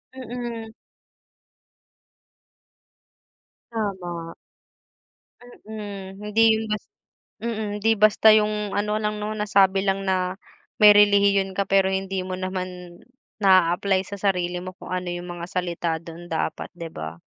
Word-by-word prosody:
mm. 235 Hz, -3 st, -6 dB, 3.0 s
Tama. 180 Hz, -6 st, -4 dB, 1.3 s
Mm, 200 Hz, -3 st, -8 dB
hindi 210 Hz, +1 st, 0 dB
yung 220 Hz, -, -3 dB
bas 210 Hz, 0 st, -2 dB, 0.6 s
mm, 220 Hz, -2 st, -3 dB
di 225 Hz, -, +5 dB
basta 215 Hz, +1 st, +5 dB
yung 210 Hz, -1 st, +1 dB
ano 210 Hz, +1 st, 0 dB
lang, 210 Hz, 0 st, -2 dB
'no, 210 Hz, +1 st, -3 dB
nasabi 195 Hz, -2 st, +3 dB
lang 195 Hz, 0 st, 0 dB
na 185 Hz, 0 st, 0 dB, 0.4 s
may 210 Hz, -1 st, +10 dB
relihiyon 200 Hz, -1 st, +4 dB
ka 200 Hz, +1 st, 0 dB
pero 195 Hz, -1 st, +4 dB
hindi 190 Hz, -1 st, -2 dB
mo 185 Hz, -, -4 dB
naman 185 Hz, -1 st, -5 dB, 0.4 s
na-a-apply 185 Hz, 0 st, +4 dB
sa 200 Hz, -, -7 dB
sarili 180 Hz, -3 st, 0 dB
mo 185 Hz, 0 st, -7 dB
kung -, -, -10 dB
ano 180 Hz, -1 st, -3 dB
yung 175 Hz, 0 st, -5 dB
mga 175 Hz, -1 st, -6 dB
salita 175 Hz, -2 st, -2 dB
dun 170 Hz, +1 st, -11 dB
dapat, 160 Hz, -, -3 dB
di 170 Hz, -1 st, -7 dB
ba? 80 Hz, -, -7 dB
195 Hz, 125 wpm, -24 LUFS, 180-210 Hz, 3.0 s, may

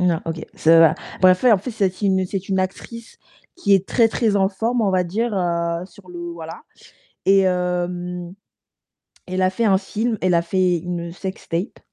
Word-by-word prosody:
Non, 175 Hz, -2 st, +2 dB
OK, 165 Hz, 0 st, -5 dB
ça 165 Hz, +1 st, +5 dB
va 165 Hz, -, +6 dB, 0.3 s
bref, 185 Hz, 0 st, +6 dB
ouais, 240 Hz, -, +7 dB
en 205 Hz, -, +4 dB
fait, 245 Hz, +7 st, -6 dB
c'est 210 Hz, -3 st, 0 dB
aussi 190 Hz, 0 st, 0 dB
c'est 195 Hz, 0 st, -5 dB
une 190 Hz, -, 0 dB
actrice 225 Hz, +5 st, -5 dB, 0.4 s
qui 205 Hz, -, +2 dB
est 190 Hz, 0 st, +1 dB
très, 230 Hz, -2 st, +3 dB
très 225 Hz, -2 st, 0 dB
en 195 Hz, -1 st, +3 dB
forme, 230 Hz, +5 st, -1 dB
on 205 Hz, -, +2 dB
va 185 Hz, -1 st, +1 dB
dire, 225 Hz, +7 st, -2 dB
heu, 170 Hz, -2 st, -1 dB
sur 185 Hz, 0 st, -19 dB
le 175 Hz, -1 st, -9 dB
voilà, 165 Hz, -, -9 dB, 0.6 s
et 195 Hz, 0 st, +6 dB
hem, 180 Hz, -1 st, -2 dB, 0.9 s
elle 185 Hz, +1 st, -3 dB
a 185 Hz, -, +3 dB
fait 210 Hz, +5 st, -1 dB
un 195 Hz, -3 st, +4 dB
film, 220 Hz, +3 st, -2 dB
elle 180 Hz, -1 st, +2 dB
a 170 Hz, -, +2 dB
fait 180 Hz, 0 st, +1 dB
une 170 Hz, 0 st, -5 dB
sextape, 185 Hz, 0 st, -5 dB
185 Hz, 190 wpm, -21 LUFS, 175-200 Hz, 0.9 s, ouais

